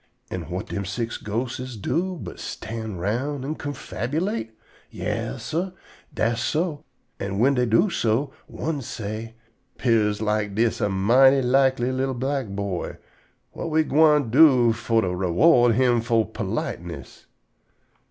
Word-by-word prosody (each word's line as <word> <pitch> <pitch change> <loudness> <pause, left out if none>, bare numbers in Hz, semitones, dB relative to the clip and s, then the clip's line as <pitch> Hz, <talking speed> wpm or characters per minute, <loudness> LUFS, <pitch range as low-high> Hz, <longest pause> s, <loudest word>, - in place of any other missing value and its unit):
An' 90 -3 -4
whut 90 +6 -5
dem 100 - -3
six 115 +5 -3
ghostes 120 +3 -4
do 180 - -1
but - - -8
stand 110 -4 -6
round 130 +9 -2
an' 150 - -2
confabulate? 145 - -3 0.4
Yas, - - -4
sah, 180 +4 -2 0.4
dass 115 +1 0
so. 155 +5 -1 0.3
An' 100 0 -3
whin 130 +6 +4
dey 125 -2 +1
do 175 - +3
so, 130 -1 0
one 155 -3 -3
say: 110 -1 -6 0.4
"'Pears 110 -4 +2
like 105 -2 -1
dis 115 +1 +1
a 105 - +2
mighty 130 +8 +5
likely 130 0 +3
li'l 130 0 -1
black 135 0 -2
boy. 100 -2 -4 0.6
Whut 165 - -4
we 160 0 +3
gwine 150 -4 +4
do 130 -5 +6
fo' 115 0 +1
to 95 - -1
_re_ward 110 - +4
him 120 -1 +3
fo' 115 -1 +2
politeness?" 85 -7 -5
120 Hz, 135 wpm, -24 LUFS, 105-140 Hz, 0.6 s, do